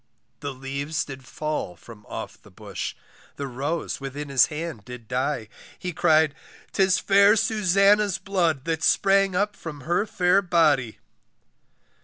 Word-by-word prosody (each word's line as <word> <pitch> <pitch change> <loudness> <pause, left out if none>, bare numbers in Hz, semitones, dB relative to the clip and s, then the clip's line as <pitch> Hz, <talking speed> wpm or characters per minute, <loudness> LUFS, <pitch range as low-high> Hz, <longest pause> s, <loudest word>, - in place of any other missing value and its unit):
The 140 - -4
leaves 140 +4 -3
did 135 -2 -9
fall 150 -8 -4
from 105 +3 -15
off - - -7
the - - -17
bush, - - -6 0.4
The 140 - -4
rose 140 +5 -3
within 140 +2 -6
his 135 -3 +5
hand 155 -7 -6
did 125 -1 -10
die, 125 -1 -1 0.3
He 180 -1 -5
cried, 155 -1 +3 0.4
'tis 190 -1 +3
fair 200 +2 +5
Susannah's 205 -1 +3
blood, 170 -8 0
That 165 -1 -1
spring 195 +1 +3
up 205 +2 0
from 150 -6 -8
her 175 +9 0
fair 180 0 +3
body. 155 - +2
155 Hz, 140 wpm, -25 LUFS, 135-190 Hz, 0.4 s, his